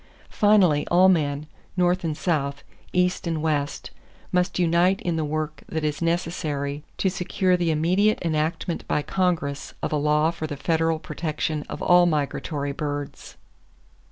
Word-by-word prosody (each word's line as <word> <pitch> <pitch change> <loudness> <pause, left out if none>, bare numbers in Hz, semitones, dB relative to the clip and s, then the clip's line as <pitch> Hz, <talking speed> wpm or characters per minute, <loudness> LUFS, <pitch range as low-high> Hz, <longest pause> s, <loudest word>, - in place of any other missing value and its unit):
Finally, 195 -8 +4
all 180 +2 +6
men, 150 -4 +1 0.3
North 180 0 +2
and 155 -2 -2
South, 140 -5 -1 0.3
East 180 0 +1
and 165 -2 -1
West, 150 -2 -2 0.4
must 180 0 +1
unite 175 +2 +3
in 175 -2 0
the 160 - 0
work 155 0 -3
that 160 -1 -3
is 150 0 -1
necessary 155 -4 -2
to - - +1
secure 185 0 +1
the 175 -2 0
immediate 180 +7 +2
enactment 165 +1 -1
by 150 - 0
Congress 170 -7 -1
of - - -1
a - - +2
law 150 +2 +2
for 160 -2 -5
the 145 -2 -5
federal 165 +1 +1
protection 155 -2 -3
of - - -5
all 175 0 +6
migratory 145 -2 -1
birds. 145 0 -5
160 Hz, 150 wpm, -24 LUFS, 150-180 Hz, 0.4 s, all